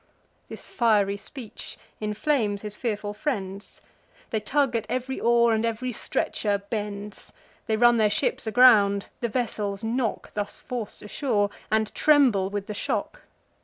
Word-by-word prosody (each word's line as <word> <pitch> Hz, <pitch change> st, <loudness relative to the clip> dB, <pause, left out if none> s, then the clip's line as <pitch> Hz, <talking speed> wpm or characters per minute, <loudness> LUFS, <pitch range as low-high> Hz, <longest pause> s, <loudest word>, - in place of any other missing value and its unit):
This -, -, -9 dB
fiery 210 Hz, -5 st, +2 dB
speech 230 Hz, +1 st, -10 dB, 0.2 s
inflames 210 Hz, -1 st, 0 dB
his 210 Hz, -1 st, -6 dB
fearful 210 Hz, -4 st, -3 dB
friends: 205 Hz, -5 st, -4 dB, 0.5 s
They 220 Hz, -, +1 dB
tug 255 Hz, +3 st, +1 dB
at 220 Hz, -2 st, -2 dB
ev'ry 255 Hz, +2 st, -2 dB
oar, 235 Hz, 0 st, +4 dB
and 220 Hz, 0 st, +1 dB
ev'ry 230 Hz, +2 st, -2 dB
stretcher 210 Hz, -2 st, -1 dB
bends; 205 Hz, -1 st, -5 dB, 0.4 s
They 220 Hz, -, +1 dB
run 240 Hz, +1 st, +5 dB
their 215 Hz, -2 st, +4 dB
ships 205 Hz, -, -1 dB
aground; 210 Hz, -4 st, +5 dB
the 235 Hz, -, -1 dB
vessels 210 Hz, -4 st, -2 dB
knock, 230 Hz, 0 st, -2 dB
(Thus 205 Hz, -1 st, -4 dB
forc'd 235 Hz, -4 st, -5 dB
ashore,) 210 Hz, -2 st, 0 dB, 0.2 s
and 220 Hz, 0 st, +1 dB
tremble 255 Hz, -11 st, +4 dB
with 200 Hz, 0 st, -4 dB
the 210 Hz, -, -5 dB
shock. -, -, -3 dB
220 Hz, 140 wpm, -26 LUFS, 205-240 Hz, 0.5 s, run